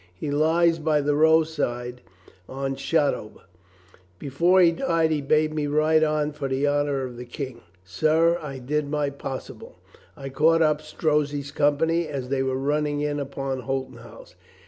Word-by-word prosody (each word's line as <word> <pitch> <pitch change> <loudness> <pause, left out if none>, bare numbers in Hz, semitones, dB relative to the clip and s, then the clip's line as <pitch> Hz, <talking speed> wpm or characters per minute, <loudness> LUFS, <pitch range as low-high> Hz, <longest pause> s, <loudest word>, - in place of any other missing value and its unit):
He 145 +11 -5
lies 165 +3 +2
by 155 -1 +1
the 145 +1 0
roadside 145 -6 +1 0.5
on 135 0 -3
Shotover. 140 -6 -1 0.8
Before 170 - +2
he 175 -2 +6
died 165 -5 0
he 150 -2 0
bade 155 +2 +1
me 150 -1 -2
ride 155 +2 +3
on 150 -1 0
for 145 -2 -5
the 135 +2 -1
honor 145 -1 0
of 125 -2 -7
the 125 - -7
King. 125 -1 -7 0.2
Sir, 160 - +2
I 140 -3 -6
did 145 +3 -2
my 145 -1 -1
possible. 135 -1 -8 0.4
I 135 0 -7
caught 160 +5 +3
up 150 -1 +1
Strozzi's 150 -2 -1
company 160 +4 +1
as 135 -4 -5
they 135 -1 0
were 130 0 -1
running 145 +1 -1
in 145 0 -1
upon 135 -1 -4
Holton 135 0 -4
House. - - -14
145 Hz, 160 wpm, -24 LUFS, 135-155 Hz, 0.8 s, he